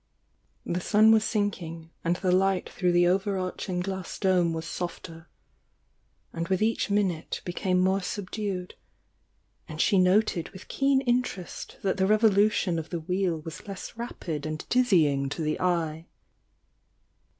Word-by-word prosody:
The 175 Hz, +1 st, -2 dB
sun 215 Hz, +3 st, +5 dB
was 220 Hz, -1 st, +5 dB
sinking, 170 Hz, -7 st, -3 dB
and 170 Hz, +1 st, +1 dB
the 185 Hz, 0 st, 0 dB
light 190 Hz, 0 st, +2 dB
through 180 Hz, -1 st, 0 dB
the 175 Hz, 0 st, +4 dB
over 190 Hz, +2 st, +1 dB
arching 185 Hz, 0 st, -3 dB
glass 190 Hz, -1 st, -5 dB
dome 185 Hz, -3 st, +2 dB
was 160 Hz, 0 st, -4 dB
softer, 165 Hz, -1 st, -6 dB, 1.1 s
and 165 Hz, 0 st, -3 dB
with 190 Hz, -1 st, +1 dB
each 225 Hz, 0 st, +1 dB
min 200 Hz, -2 st, +2 dB
ute 160 Hz, -2 st, -6 dB
became 180 Hz, +1 st, 0 dB
more 190 Hz, +2 st, +2 dB
subdued, 190 Hz, -1 st, -4 dB, 0.5 s
— -, -, -43 dB
and 155 Hz, 0 st, -7 dB
she 195 Hz, +3 st, +4 dB
noted 185 Hz, -1 st, +2 dB
with 190 Hz, -, -13 dB
keen 275 Hz, -1 st, +2 dB
interest 245 Hz, -8 st, -2 dB
that 195 Hz, 0 st, 0 dB
the 190 Hz, 0 st, +2 dB
revolution 205 Hz, -4 st, +3 dB
of 160 Hz, -, -7 dB
the 170 Hz, -2 st, -3 dB
wheel 180 Hz, -1 st, -1 dB
was 165 Hz, +6 st, -9 dB
less 195 Hz, +1 st, -7 dB
rapid 165 Hz, -10 st, -5 dB
and 155 Hz, 0 st, -5 dB
dizzying 160 Hz, -, +3 dB
to 150 Hz, +3 st, -4 dB
the 155 Hz, 0 st, -1 dB
eye. 165 Hz, -2 st, -1 dB
185 Hz, 150 wpm, -27 LUFS, 170-205 Hz, 1.1 s, sun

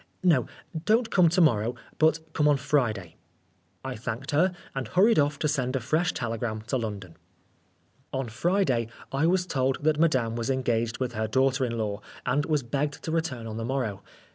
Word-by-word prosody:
No, 160 Hz, -10 st, +4 dB, 0.4 s
don't 225 Hz, +2 st, +3 dB
come 180 Hz, -3 st, +5 dB
to 175 Hz, +3 st, +2 dB
morrow, 120 Hz, -6 st, +3 dB, 0.2 s
but 160 Hz, 0 st, +2 dB
come 150 Hz, -, +2 dB
on 145 Hz, -1 st, +4 dB
Friday." 115 Hz, -, -1 dB, 0.7 s
I 130 Hz, -1 st, -3 dB
thanked 115 Hz, +4 st, -5 dB
her, 170 Hz, +6 st, +3 dB, 0.2 s
and 135 Hz, -3 st, -3 dB
hurried 190 Hz, -, +4 dB
off 145 Hz, 0 st, +2 dB
to 150 Hz, -, 0 dB
send 130 Hz, -3 st, 0 dB
a -, -, +1 dB
fresh 155 Hz, +8 st, +1 dB
telegram 115 Hz, -2 st, -3 dB
to 130 Hz, -, +1 dB
London. 100 Hz, -7 st, -5 dB, 0.9 s
On 135 Hz, -1 st, -2 dB
Friday 130 Hz, -, +1 dB, 0.2 s
I 140 Hz, +4 st, +2 dB
was 180 Hz, +1 st, +2 dB
told 135 Hz, -3 st, 0 dB
that 155 Hz, 0 st, +2 dB
Madame 130 Hz, -9 st, +2 dB
was 115 Hz, +2 st, -2 dB
engaged 120 Hz, -3 st, 0 dB
with 125 Hz, -2 st, -2 dB
her 110 Hz, 0 st, -1 dB
daughter 135 Hz, +3 st, +2 dB
in 115 Hz, -1 st, -3 dB
law, 105 Hz, -2 st, -2 dB, 0.2 s
and 140 Hz, +4 st, +1 dB
was 150 Hz, -4 st, +1 dB
begged 140 Hz, +4 st, -2 dB
to 160 Hz, -, -3 dB
return 160 Hz, -8 st, -2 dB
on 110 Hz, -1 st, -5 dB
the 115 Hz, -, -3 dB
morrow. 120 Hz, -5 st, -2 dB
130 Hz, 185 wpm, -27 LUFS, 115-155 Hz, 0.9 s, come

